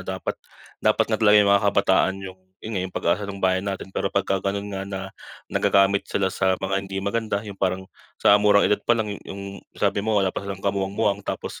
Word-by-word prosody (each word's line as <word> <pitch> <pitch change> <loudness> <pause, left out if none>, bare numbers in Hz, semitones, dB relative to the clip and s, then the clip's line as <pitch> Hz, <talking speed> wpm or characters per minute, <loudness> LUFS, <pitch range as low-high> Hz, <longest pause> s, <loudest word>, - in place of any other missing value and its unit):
dapat - - -4 0.5
dapat - - +3
nga 110 - 0
talaga 105 -1 +6
yung 100 -1 +5
mga 100 0 +3
kabataan 95 -1 +3
yung 95 0 -9 0.2
yun 110 -1 -4
nga 95 0 -3
pag-asa 95 +5 0
ng 100 -1 -7
bayan 95 0 +1
natin, 95 -1 -5
pero - - -1
pagka 95 0 0
ganon 100 +1 -3
nga 95 0 -4
na 95 -1 -4 0.5
nagagamit 100 0 +3
sila 95 -1 0
sa 95 -1 +1
mga 95 0 -1
hindi 95 0 -7
maganda. 100 0 -1
Yung 100 -2 -8
parang 95 0 0 0.4
sa 100 - +6
murang 105 -1 +5
edad 105 - +2
palang 110 -3 +1
yung 100 0 -7 0.2
sabi - - +1
mo 110 +1 0
wala 95 -2 +2
pa - - -4
silang 100 -1 -6
kamuwang-muwang, 100 +1 0
tapos - - -5
100 Hz, 200 wpm, -23 LUFS, 95-100 Hz, 0.5 s, talaga